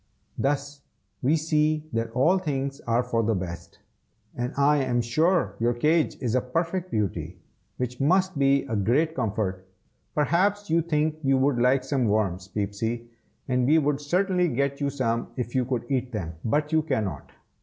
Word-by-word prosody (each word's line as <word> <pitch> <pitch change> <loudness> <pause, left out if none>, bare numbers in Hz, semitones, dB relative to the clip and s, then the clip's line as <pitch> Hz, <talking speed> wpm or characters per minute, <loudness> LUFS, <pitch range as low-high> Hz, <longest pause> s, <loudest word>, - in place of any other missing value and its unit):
Thus 145 +1 -2 0.4
we 140 +5 +3
see 155 -1 +1
that 115 0 -1
all 165 +10 +3
things 140 -4 -3
are 120 +1 +2
for 120 -2 0
the 110 0 +1
best! 85 -2 -6 0.6
and 120 +1 -2
I 145 +1 +4
am 130 -3 +1
sure 155 - +2
your 120 +1 +1
cage 155 +6 +2
is 120 -4 -1
a 130 - +3
perfect 170 +8 -2
beauty, 90 - -2 0.4
which 125 0 -3
must 185 +5 +2
be 140 0 +3
a 115 -5 -4
great 130 +11 +2
comfort. 95 - -2 0.5
Perhaps 190 +6 +1
you 165 +1 +4
think 155 -1 0
you 135 -2 +3
would 130 -1 +2
like 130 +2 +3
some 135 -2 0
worms, 100 -4 0
Peepsy; 110 +4 -3 0.4
and 125 -1 +1
we 155 +3 +5
would 150 -2 +1
certainly 180 +4 +1
get 140 0 -1
you 140 - +1
some 115 -4 -1
if 120 -2 -4
you 130 -1 +1
could 120 -2 -2
eat 130 -1 -1
them, 85 -7 -4
but 150 +7 0
you 160 0 +3
cannot. 105 - -3
135 Hz, 170 wpm, -26 LUFS, 115-155 Hz, 0.6 s, we